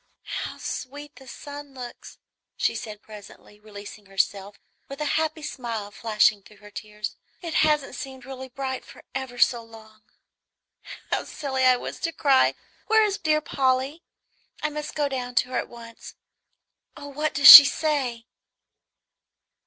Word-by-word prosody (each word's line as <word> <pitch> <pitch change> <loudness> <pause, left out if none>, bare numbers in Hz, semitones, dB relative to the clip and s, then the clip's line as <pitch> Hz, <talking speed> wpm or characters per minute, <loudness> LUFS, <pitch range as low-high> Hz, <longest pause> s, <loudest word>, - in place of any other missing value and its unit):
"How - - -5
sweet 290 +3 -7
the 265 - -15
sun 285 +1 -10
looks!" 245 -2 -10 0.4
she - - 0
said 210 -1 -8
presently, 210 0 -14
releasing 210 -1 -12
herself, 195 +1 -2 0.3
with 275 - -9
a 300 - -2
happy 315 0 -1
smile 230 -8 -5
flashing 215 -1 +1
through 210 +2 -19
her 210 0 -16
tears; 210 0 -7 0.3
"it 335 -2 -5
hasn't 300 -3 +1
seemed 265 -2 -9
really 260 0 -9
bright 260 0 -5
for - - -16
ever 265 -2 -6
so 240 0 +3
long. 220 -1 -16 1.1
How - - -1
silly 265 -3 -2
I 255 -1 +5
was - - -7
to 330 - -2
cry! 275 -5 +2 0.3
Where 440 0 +4
is 410 -2 -1
dear 305 -1 +1
Polly? 270 +1 -1 0.6
I 305 - -1
must 300 0 -6
go 295 -1 0
down 250 -2 -5
to 250 - +1
her 255 - -1
at - - -6
once. 230 -1 -12 0.8
Oh, 285 - -9
what 300 +1 -3
does 290 0 +6
she 285 - +15
say?" 275 -6 -2
260 Hz, 155 wpm, -24 LUFS, 220-290 Hz, 1.1 s, she